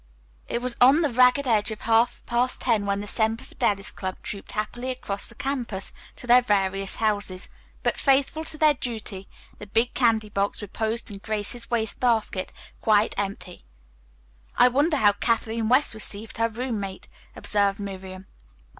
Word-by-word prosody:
It 235 - -3
was 250 -1 -1
on 270 +6 +7
the 295 -5 +1
ragged 250 +3 +4
edge 220 -3 +2
of 220 -1 -6
half 230 +1 +2
past 245 +1 0
ten 220 -5 +1
when 200 0 0
the - - -6
Semper 220 +2 +1
Fidelis 195 -1 -1
Club 185 -1 -5
trooped 200 - -6
happily 240 +4 -3
across 205 -6 -4
the 235 - -15
campus 245 -8 -2 0.2
to - - -11
their 245 +1 +6
various 195 -3 0
houses, 205 -4 -1 0.4
but, - - 0
faithful 280 +3 +2
to 315 - -3
their 305 -1 +5
duty, 220 -7 -5 0.3
the 210 - -8
big 225 +4 +1
candy 225 -4 +2
box 200 0 -1
reposed 220 +3 -2
in 200 - -8
Grace's 215 +3 -4
waste 225 -3 -1
basket, 220 -6 0 0.3
quite 215 -1 +3
empty. 195 -2 -5 0.9
"I 250 - +7
wonder 295 +5 +2
how 205 -6 +5
Kathleen 225 +1 -1
West 260 +2 +4
received 220 0 -3
her 230 0 +2
roommate," 220 -5 -4 0.3
observed 200 -1 +1
Miriam. 190 -1 -7
220 Hz, 160 wpm, -25 LUFS, 200-245 Hz, 0.9 s, on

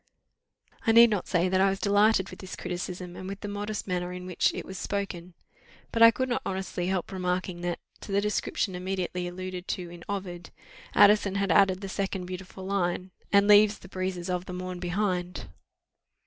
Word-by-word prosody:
I 225 - +5
need 230 0 +8
not 205 -4 -1
say 180 -1 +2
that 185 +1 +2
I 195 - +5
was 195 0 -2
delighted 205 -1 +3
with - - -11
this 190 - -7
criticism, 180 0 -5
and 185 - -7
with 200 +1 -6
the 205 - -4
modest 205 +1 -4
manner 180 -1 -2
in 180 0 -7
which 180 -2 +1
it - - -6
was 190 -1 -7
spoken: 180 -3 -4 0.6
but 230 - -1
I 230 - +11
could 245 +4 -1
not 245 - -1
honestly 190 -2 -3
help 185 -1 -1
remarking 180 -1 -2
that, 175 -1 -2 0.2
to - - -9
the 195 - +3
description 210 -1 -1
immediately 180 -1 -3
alluded 185 0 -6
to 175 -2 -4
in 175 -1 -11
Ovid, 180 -3 -5 0.5
Addison 205 -1 +6
had 200 -2 +1
added 190 +1 +4
the 195 - -5
second 195 -1 -3
beautiful 185 +1 -8
line, 185 -1 -1 0.2
"And 200 0 +5
leaves 210 0 +6
the 190 - -14
breezes 185 -1 -3
of 180 -1 -2
the 180 - -7
morn 180 0 -5
behind." 180 0 -2
185 Hz, 190 wpm, -28 LUFS, 180-200 Hz, 0.6 s, I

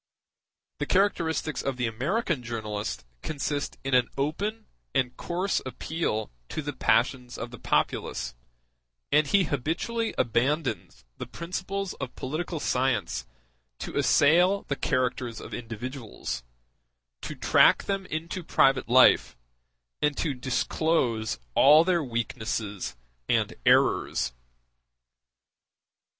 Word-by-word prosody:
The - - -2
characteristics 170 -6 +1
of 135 -2 -2
the 125 - 0
American 145 - -1
journalist 105 - -4 0.2
consist 145 -1 -3
in 135 0 -2
an 125 -2 +4
open 200 +11 -2 0.3
and 125 -1 +1
coarse 180 +3 -1
appeal 130 - -3 0.2
to 155 - -4
the 145 0 -4
passions 125 -1 +1
of 120 - -6
the 120 - -10
populace; - - -1 0.8
and 150 0 +4
he 200 +3 +4
habitually 170 - -2
abandons 130 - 0
the - - -5
principles 185 +2 -4
of 135 -2 -5
political 160 +5 -3
science 110 - 0 0.5
to - - -6
assail 180 +7 +4
the 140 - -2
characters 125 -3 -1
of - - -9
individuals, 115 - -5 0.8
to - - -6
track - - +5
them 195 -1 -2
into 170 +3 -4
private 135 -5 +3
life, 125 - +5 0.6
and 150 -1 +2 0.3
disclose 130 -5 0 0.2
all 150 - +7
their 170 -2 +2
weaknesses 110 - -3 0.3
and - - +2
errors. 65 -1 +3
135 Hz, 110 wpm, -27 LUFS, 120-165 Hz, 0.8 s, all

